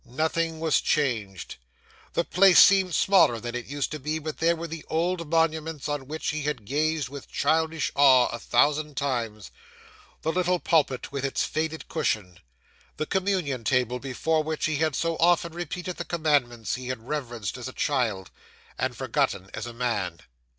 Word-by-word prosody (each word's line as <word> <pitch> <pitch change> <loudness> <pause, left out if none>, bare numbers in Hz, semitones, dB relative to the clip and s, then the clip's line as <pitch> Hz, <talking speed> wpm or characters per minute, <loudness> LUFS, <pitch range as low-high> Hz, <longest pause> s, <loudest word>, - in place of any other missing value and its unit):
Nothing 160 +5 -1
was 160 -1 +2
changed. 110 -11 -1 0.6
The 170 - +1
place 185 0 +5
seemed 190 -3 +6
smaller 165 - +4
than 120 +1 -5
it 125 -1 -5
used 145 0 -3
to 155 - -4
be; 150 +3 -2
but 155 -1 -6
there 170 +1 +3
were 165 +1 -6
the 165 -1 -7
old 170 0 -1
monuments 160 -2 0
on 145 -3 -3
which 155 +2 -3
he 155 0 -2
had 145 -7 -3
gazed 150 +2 0
with 140 +1 -10
childish 160 0 +1
awe 130 -3 +6
a 120 - -5
thousand 150 +2 +1
times; 115 -7 -2 0.7
the 160 - +1
little 180 +1 +1
pulpit 145 -8 +1
with 140 -1 -4
its 135 - 0
faded 160 -1 -3
cushion; 90 -4 -2 0.6
the 155 - -1
Communion 180 -9 -1
table 125 +1 +1
before 145 +5 0
which 155 0 -2
he 155 -2 0
had 155 -2 0
so 165 -1 -1
often 170 0 +3
repeated 175 +1 -5
the - - -3
Commandments 140 - 0
he 125 +1 -5
had 125 -2 -5
reverenced 120 -9 -4
as 125 0 -6
a - - -6
child, 115 -11 -1 0.5
and - - -1
forgotten 95 0 -1
as - - -5
a - - -6
man. 105 -8 -2
150 Hz, 170 wpm, -26 LUFS, 125-160 Hz, 0.7 s, seemed